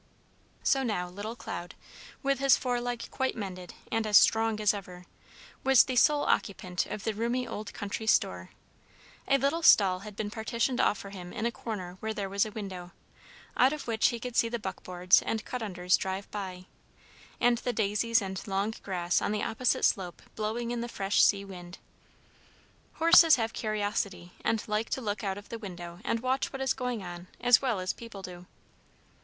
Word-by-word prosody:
So 270 - +3
now 210 -8 -1
little 205 +5 -6
Cloud, 175 -6 -7 0.5
with 275 -1 +1
his 275 -2 +5
foreleg 245 -1 -2
quite 265 0 -1
mended 185 -4 -7 0.2
and 225 -1 0
as 210 -2 +7
strong 225 -1 +4
as 210 -1 +3
ever, 180 -3 -8 0.6
was 265 -2 +7
the 255 - -3
sole 290 +4 +4
occupant 185 -3 -1
of 210 - -6
the 220 - -1
roomy 235 +3 -1
old 210 0 -6
country 205 +2 -4
store. 90 - +2 0.8
A 275 - +4
little 280 +5 0
stall 190 - +6
had 210 +1 -10
been 210 0 -3
partitioned 235 +3 -1
off 210 - +2
for 200 - -9
him 180 -3 -8
in 215 - -3
a 235 - +1
corner 185 -7 -6
where 220 0 -3
there 200 -1 -3
was 200 +2 +1
a - - -8
window, 185 -4 -7 0.6
out 260 +3 +4
of 300 -2 -6
which 225 -1 +3
he 235 - -2
could 245 0 -6
see 230 - +3
the 235 - -2
buckboards 180 -3 +2
and 220 -1 -3
cut 250 - -4
unders 180 -4 +1
drive 190 +1 -4
by, 185 -3 -6 0.7
and 240 -1 +3
the 245 - -1
daisies 220 +1 +1
and 190 +1 -5
long 200 +2 -1
grass 180 -2 0
on - - -1
the 210 -1 -1
opposite 250 +2 +1
slope 180 -3 -1
blowing 225 +2 -2
in 240 -1 -2
the 240 - -4
fresh 195 -2 +1
sea 200 -1 +3
wind. 175 -2 -10 1.2
Horses 330 0 +7
have 225 -1 -2
curiosity, 205 -4 -2
and 225 -1 0
like 210 +1 -1
to - - -1
look 210 -2 -3
out 195 -1 -2
of 205 - -11
the 230 - -6
window 175 -4 -8
and 230 0 -1
watch 260 +2 0
what 270 - -6
is 265 - +2
going 250 -5 -3
on 175 0 -8
as 245 -1 +5
well 245 -7 0
as 185 0 -1
people 230 -4 -10
do. 180 -1 -9
210 Hz, 190 wpm, -29 LUFS, 190-235 Hz, 1.2 s, as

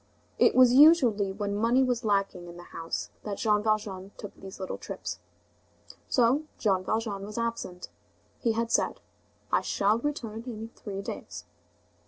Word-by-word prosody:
It - - +5
was 255 -1 +7
usually 255 - +6
when 200 0 -3
money 235 +5 +3
was 250 -2 0
lacking 195 -4 0
in 175 0 -10
the 175 - -10
house 165 0 -4
that 205 -2 -5
Jean 210 -2 +2
Valjean 210 -3 -1
took 205 - -8
these 190 0 -11
little 190 - -5
trips. - - -6 0.9
So 260 +5 +3
Jean 190 -4 +1
Valjean 215 -2 -2
was 210 +2 -7
absent. 230 -6 -3 0.5
He 230 -3 +1
had 230 +1 -1
said: - - +1 0.5
"I - - +3
shall 205 +3 +1
return 235 -6 -4
in 225 -2 -6
three 200 -4 -7
days." - - -7
215 Hz, 155 wpm, -28 LUFS, 195-235 Hz, 0.9 s, was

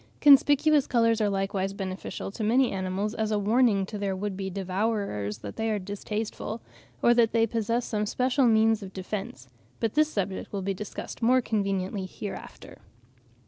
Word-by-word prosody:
Conspicuous 290 +1 +5
colours 230 -2 +2
are 210 - +2
likewise 195 0 -1
beneficial 190 0 -5
to 215 - -5
many 245 +4 +3
animals 190 +2 -2
as 220 -2 -1
a 210 - +1
warning 210 -1 +3
to 210 +1 -7
their 195 -1 -1
would 200 +1 -3
be 190 0 -4
devourers 190 - -2
that 100 - -7
they 225 0 -1
are 215 - +1
distasteful, 210 +3 -4 0.4
or 240 - +6
that 235 -2 +3
they 225 -1 +4
possess 230 +1 -1
some 210 -1 -1
special 255 +3 +2
means 220 -1 +4
of 195 -1 -9
defence; 190 -9 -6 0.3
but 225 -2 -1
this 305 0 +3
subject 195 -2 -3
will 195 -2 -3
be 195 +1 -1
discussed 210 +5 -7
more 250 +3 +4
conveniently 195 -4 -1
hereafter. 200 +2 -9
210 Hz, 170 wpm, -27 LUFS, 195-230 Hz, 0.4 s, or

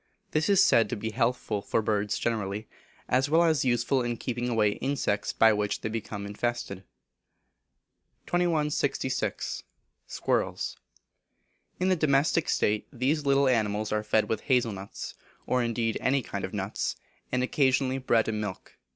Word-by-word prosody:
This 155 +3 +1
is 195 -1 +6
said 115 - +4
to - - -2
be 110 +1 -4
healthful 115 -3 0
for 105 - 0
birds 105 -1 0
generally, 105 -2 -2 0.4
as 130 +3 +2
well 165 +3 +5
as 160 -5 +3
useful 125 +1 +2
in 120 -1 -2
keeping 120 0 -3
away 110 -3 +3
insects 130 -7 -1
by 110 -1 +5
which 105 -1 -1
they - - -2
become 105 -2 -5
infested. 105 -2 -3 1.4
2166. 150 -6 0 0.5
Squirrels. - - -1 1.0
In 185 +1 +2
a - - +4
domestic 155 0 +2
state 105 0 +1
these 140 +3 0
little 140 0 +4
animals 110 -3 +1
are 105 0 +1
fed 110 0 +1
with 110 - -1
hazel 125 -3 +2
nuts, 100 0 -7 0.3
or 125 - +1
indeed 115 -1 -1
any 135 0 +2
kind 100 -2 -5
of 95 - -3
nuts; 100 0 -2 0.4
and 125 0 +1
occasionally 130 0 +2
bread 115 -3 +2
and 110 -1 -1
milk. 105 -3 -7
120 Hz, 150 wpm, -28 LUFS, 105-135 Hz, 1.4 s, is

